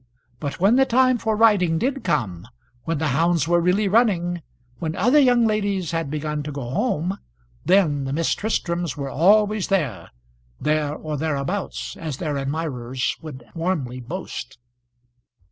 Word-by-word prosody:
But 145 Hz, -2 st, -4 dB
when 200 Hz, +7 st, +4 dB
the 270 Hz, -, +5 dB
time 255 Hz, 0 st, +3 dB
for 220 Hz, 0 st, 0 dB
riding 205 Hz, -7 st, +4 dB
did 270 Hz, +7 st, -1 dB
come, 100 Hz, -, -1 dB, 0.4 s
when 165 Hz, -1 st, -1 dB
the 155 Hz, +1 st, 0 dB
hounds 165 Hz, +3 st, +2 dB
were 175 Hz, 0 st, +3 dB
really 185 Hz, +4 st, +2 dB
running 185 Hz, -5 st, +2 dB, 0.4 s
when 160 Hz, -1 st, -3 dB
other 245 Hz, +10 st, +4 dB
young 245 Hz, -4 st, +4 dB
ladies 200 Hz, -5 st, 0 dB
had 165 Hz, -3 st, -2 dB
begun 150 Hz, 0 st, -3 dB
to 150 Hz, +1 st, -5 dB
go 140 Hz, -4 st, -5 dB
home 190 Hz, -, -1 dB, 0.5 s
then 160 Hz, -7 st, +3 dB
the 135 Hz, -, -3 dB
Miss 160 Hz, +3 st, +1 dB
Tristrams 170 Hz, -8 st, -2 dB
were 140 Hz, -1 st, -4 dB
always 210 Hz, +4 st, +3 dB
there; 155 Hz, -, -1 dB, 0.5 s
there 150 Hz, -1 st, 0 dB
or 155 Hz, -1 st, -5 dB
thereabouts, 155 Hz, +5 st, -3 dB
as 155 Hz, -5 st, -5 dB
their 150 Hz, -3 st, -2 dB
admirers 135 Hz, -3 st, -2 dB
would 130 Hz, -6 st, -9 dB
warmly 160 Hz, -8 st, -2 dB
boast. 135 Hz, -1 st, -7 dB
165 Hz, 150 wpm, -23 LUFS, 145-200 Hz, 0.5 s, the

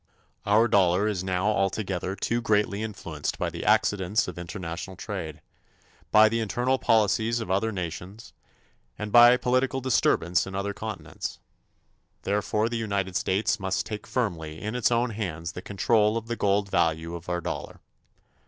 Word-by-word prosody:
Our 110 Hz, +3 st, +5 dB
dollar 95 Hz, -1 st, +3 dB
is 100 Hz, -4 st, -1 dB
now 95 Hz, 0 st, -1 dB
altogether 95 Hz, -2 st, -1 dB
too 120 Hz, +3 st, -1 dB
greatly 105 Hz, -2 st, +1 dB
influenced 90 Hz, -9 st, -4 dB
by -, -, -2 dB
the -, -, -6 dB
accidents 100 Hz, +2 st, +2 dB
of -, -, -7 dB
international 85 Hz, +1 st, -6 dB
trade, 85 Hz, -7 st, -6 dB, 0.7 s
by 110 Hz, 0 st, +7 dB
the 115 Hz, +1 st, 0 dB
internal 125 Hz, +4 st, 0 dB
policies 110 Hz, +1 st, +2 dB
of 110 Hz, -5 st, -4 dB
other 100 Hz, +4 st, +1 dB
nations 95 Hz, +3 st, -6 dB, 0.6 s
and 105 Hz, -1 st, -5 dB
by 120 Hz, +1 st, +8 dB
political 130 Hz, +2 st, +1 dB
disturbance 95 Hz, -9 st, +2 dB
in 95 Hz, -, -7 dB
other 100 Hz, +1 st, -2 dB
continents. 110 Hz, +2 st, -6 dB, 0.9 s
Therefore 105 Hz, +2 st, 0 dB
the 120 Hz, 0 st, -2 dB
United 100 Hz, -4 st, -2 dB
States 105 Hz, +4 st, +1 dB
must 95 Hz, 0 st, -1 dB
take 105 Hz, -1 st, -6 dB
firmly 80 Hz, -10 st, -2 dB
in 110 Hz, +1 st, -4 dB
its 125 Hz, -1 st, +1 dB
own 120 Hz, 0 st, +1 dB
hands 85 Hz, -6 st, -4 dB
the 90 Hz, -, -8 dB
control 105 Hz, +2 st, +2 dB
of 115 Hz, -, -5 dB
the 120 Hz, +1 st, -3 dB
gold 100 Hz, -2 st, +1 dB
value 80 Hz, +1 st, +1 dB
of 85 Hz, +1 st, -7 dB
our 90 Hz, 0 st, 0 dB
dollar. -, -, -5 dB
100 Hz, 155 wpm, -26 LUFS, 95-110 Hz, 0.9 s, by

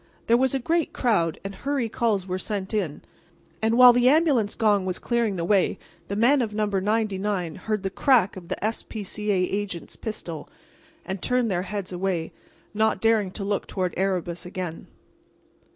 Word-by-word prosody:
There 230 Hz, -, +4 dB
was 265 Hz, +2 st, +2 dB
a -, -, +3 dB
great 320 Hz, +5 st, 0 dB
crowd, 170 Hz, -10 st, +1 dB
and 195 Hz, 0 st, -5 dB
hurry 275 Hz, +1 st, -1 dB
calls 215 Hz, -4 st, 0 dB
were 185 Hz, 0 st, -3 dB
sent 200 Hz, 0 st, -4 dB
in; 180 Hz, -9 st, -2 dB, 0.6 s
and 225 Hz, +1 st, +2 dB
while 250 Hz, -1 st, +9 dB
the 245 Hz, +1 st, +4 dB
ambulance 280 Hz, -8 st, +3 dB
gong 210 Hz, -3 st, +3 dB
was 185 Hz, -1 st, -2 dB
clearing 235 Hz, -4 st, 0 dB
the 170 Hz, -2 st, -2 dB
way 195 Hz, 0 st, +2 dB, 0.3 s
the 200 Hz, -, -3 dB
men 250 Hz, +6 st, +4 dB
of 215 Hz, -3 st, -3 dB
No. 215 Hz, 0 st, +1 dB
99 200 Hz, -3 st, -1 dB
heard 215 Hz, +4 st, -3 dB
the 195 Hz, -, -2 dB
crack 230 Hz, -4 st, +3 dB
of 180 Hz, -2 st, -10 dB
the -, -, -3 dB
S. 220 Hz, +1 st, -1 dB
P. 215 Hz, -2 st, -7 dB
C. 210 Hz, +2 st, -4 dB
A. 205 Hz, -, +3 dB
agent's 195 Hz, -2 st, -3 dB
pistol, 170 Hz, -8 st, -6 dB, 0.6 s
and 190 Hz, -1 st, -4 dB
turned 250 Hz, -3 st, +1 dB
their 175 Hz, -1 st, 0 dB
heads 195 Hz, 0 st, -5 dB
away, 180 Hz, -3 st, -2 dB, 0.4 s
not 220 Hz, +1 st, +1 dB
daring 225 Hz, -3 st, +2 dB
to 195 Hz, +2 st, -6 dB
look 200 Hz, 0 st, -1 dB
toward 185 Hz, -2 st, -2 dB
Erebus 180 Hz, -2 st, -1 dB
again. 180 Hz, -2 st, -6 dB
205 Hz, 185 wpm, -25 LUFS, 185-230 Hz, 0.6 s, while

